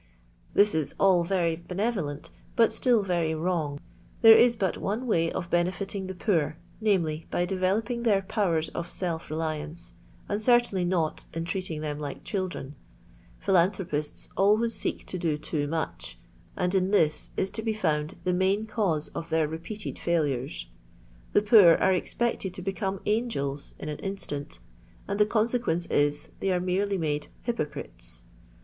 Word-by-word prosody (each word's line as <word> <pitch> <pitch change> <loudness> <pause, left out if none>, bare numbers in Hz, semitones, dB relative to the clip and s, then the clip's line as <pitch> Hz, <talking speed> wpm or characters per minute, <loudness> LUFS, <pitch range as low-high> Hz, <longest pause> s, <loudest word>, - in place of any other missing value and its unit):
This 205 +1 +5
is 155 -3 -1
all 185 -3 +5
very 170 -2 +1
benevolent, 175 -3 -3 0.2
but 230 -2 +5
still 240 -5 +3
very 170 -4 0
wrong. 155 -4 -1 0.4
There 225 0 +11
is 235 +1 +6
but 190 -5 0
one 220 +6 -2
way 165 -8 +2
of 175 -1 -4
benefiting 185 +3 -1
the 190 - -5
poor, 165 -5 0 0.2
viz., 175 -8 +2
by 175 - 0
developing 195 +6 0
their 205 -5 +3
powers 175 -6 0
of 170 - -5
self 170 -3 -3
reliance, 155 +1 -4 0.3
and 205 +1 -1
certainly 240 -6 +3
not 170 -3 0
in 165 0 -2
treating 180 -4 -3
them 150 -1 -3
like 145 -2 -6
children. 185 -8 -3 0.6
Philanthropists 180 -5 +1
always 215 +4 +3
seek 200 - -3
to 185 - -5
do 160 -3 0
too 150 -1 -2
much, 85 - -4 0.4
and 180 +1 0
in 190 -1 +2
this 160 -7 +2
is 190 - 0
to 220 - -3
be 220 0 -1
found 155 -6 0
the 180 - +1
main 190 +4 +2
cause 200 -9 0
of 165 - -6
their 160 -1 +2
repeated 170 +7 -6
failures. 140 - -1 0.7
The 205 - +4
poor 205 -6 +8
are 190 - +3
expected 190 0 -1
to 185 - -5
become 195 0 -2
angels 205 - -1
in - - -7
an 150 -1 -4
instant, 170 -8 -5 0.5
and 200 +1 -2
the 210 - +5
consequence 220 -6 +1
is, 145 0 +1
they 195 - 0
are 180 - +2
merely 190 +2 0
made 150 -3 -1 0.2
hypoeriiei. 150 - -4
180 Hz, 155 wpm, -27 LUFS, 155-205 Hz, 0.7 s, There